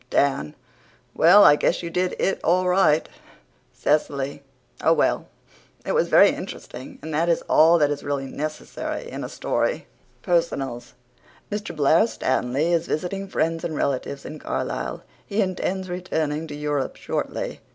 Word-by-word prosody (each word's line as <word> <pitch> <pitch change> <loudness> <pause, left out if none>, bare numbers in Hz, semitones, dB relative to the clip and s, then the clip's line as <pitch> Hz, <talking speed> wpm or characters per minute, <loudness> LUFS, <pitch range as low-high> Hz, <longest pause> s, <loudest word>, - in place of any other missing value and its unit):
DAN: 105 - +1 0.6
"Well, 185 +6 +7
I 145 - +8
guess 175 - 0
you 170 - -5
did 180 +1 0
it 195 - 0
all 180 +2 +2
right." 180 -4 +3 0.6
CECILY: 140 -2 -1 0.4
"Oh, - - +5
well, - - +1 0.6
it - - -1
was - - +2
very - - +7
interesting, 125 +2 -8
and 160 0 -5
that 165 +3 +1
is 170 - +1
all 165 +2 +5
that 145 -2 +2
is 145 - -3
really 140 -1 -2
necessary 155 - -5
in - - -6
a - - -5
story." - - -1 0.2
) - - -36
PERSONALS 135 - -1 0.6
Mr. 210 -2 -4
Blair 155 +8 +4
Stanley 145 - 0
is 170 0 +1
visiting 195 +5 -3
friends 165 -2 -1
and 160 - -3
relatives 140 0 -2
in 155 - -7
Carlisle. - - -3 0.2
He 205 +1 -3
intends 190 -1 -1
returning 160 -4 -2
to 150 - -7
Europe 145 -2 -2
shortly. - - -4
160 Hz, 150 wpm, -23 LUFS, 145-180 Hz, 0.6 s, I